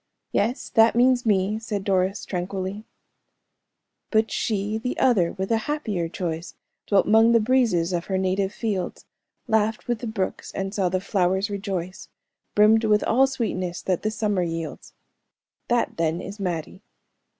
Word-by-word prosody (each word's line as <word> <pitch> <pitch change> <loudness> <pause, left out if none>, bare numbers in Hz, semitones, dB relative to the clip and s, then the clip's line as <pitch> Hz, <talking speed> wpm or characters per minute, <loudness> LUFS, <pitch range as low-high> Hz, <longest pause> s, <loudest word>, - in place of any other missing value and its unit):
'" - - -56
"Yes, 235 +6 -1
that 225 0 +5
means 245 0 +3
me," 205 +1 +2
said 215 -3 -4
Doris, 190 0 0
tranquilly. 190 +3 -4 1.2
"'But 220 0 +2
she, 210 0 -1
the 250 +2 -3
other, 195 -10 +3
with 190 +2 -4
a 225 - +4
happier 210 - -2
choice, 165 -2 -4 0.3
Dwelt 200 -2 +3
'mong 225 +2 +5
the 230 - +6
breezes 215 -8 +2
of 170 0 -1
her 190 - -1
native 190 +1 0
fields, 205 -5 -3 0.4
Laughed 220 -1 +1
with 240 -2 -1
the 240 - -5
brooks, 205 -4 -3
and 195 0 -3
saw 195 -4 +1
the 185 +1 -1
flowers 190 +1 0
rejoice; 190 -2 -4 0.5
Brimmed 215 +2 +5
with 210 -1 +3
all 265 +4 +4
sweetness 185 -9 -3
that 185 -3 0
the 215 - 0
summer 210 -3 0
yields.'" 165 -2 -5 0.7
"That, 240 -1 0
then, 165 0 0
is 200 +3 -8
Mattie." 180 -1 -4
200 Hz, 155 wpm, -24 LUFS, 185-220 Hz, 1.2 s, the